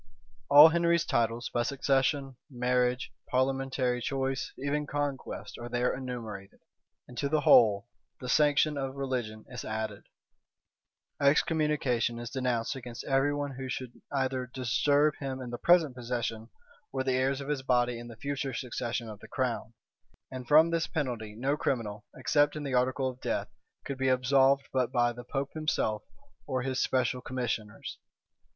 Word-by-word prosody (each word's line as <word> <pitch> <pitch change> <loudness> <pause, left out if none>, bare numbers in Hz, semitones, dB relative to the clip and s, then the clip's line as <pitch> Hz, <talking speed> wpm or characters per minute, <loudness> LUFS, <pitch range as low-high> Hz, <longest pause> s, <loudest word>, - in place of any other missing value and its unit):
All 145 +3 +10
Henry's 170 0 +2
titles, 120 -1 0
by 120 - +2
succession, 135 +1 0
marriage, 125 0 0 0.2
parliamentary 130 -1 0
choice, 135 +1 -2
even 145 +2 -2
conquest, 145 -2 -4
are 120 0 -6
there 120 +1 +1
enumerated; 115 -7 -7 0.5
and 125 - -12
to 140 - 0
the 155 0 +2
whole 115 -5 +5 0.3
the 125 - -7
sanction 150 +1 +3
of 135 0 -3
religion 125 -6 -3
is - - -7
added; 110 -2 -4 1.2
excommunication 140 -5 +2
is 120 0 -6
denounced 125 -1 -1
against 120 -2 -7
every 135 +1 +2
one 145 -1 -2
who 130 -1 -5
should 125 -1 -6
either 130 -2 -1
disturb 140 +4 +2
him 135 -2 -4
in 125 -2 -6
the 120 - -5
present 165 -7 +4
possession, 115 -2 -3 0.4
or 130 - -1
the 130 -1 +1
heirs 130 +1 +1
of 140 0 -6
his 145 -3 -1
body 125 -2 +1
in 120 - -9
the 115 -2 -11
future 140 0 -3
succession 120 -3 -3
of 105 -2 -8
the - - -12
crown; 120 -3 -2 0.6
and 130 -1 -7
from 160 +4 +6
this 165 0 0
penalty 120 -9 -3
no 135 +5 0
criminal, 110 -8 -2
except 145 0 +2
in 150 - -4
the 140 -2 -3
article 130 +1 +1
of 130 0 -6
death, - - -2 0.4
could 135 -1 -5
be 130 0 +2
absolved 135 +2 +3
but 130 -2 +1
by 120 0 +2
the 120 +1 -9
pope 135 +2 -3
himself, 155 -9 0 0.5
or 130 -3 -1
his 130 0 -1
special 125 -1 +1
commissioners. 115 -4 -4
130 Hz, 160 wpm, -30 LUFS, 120-140 Hz, 1.2 s, All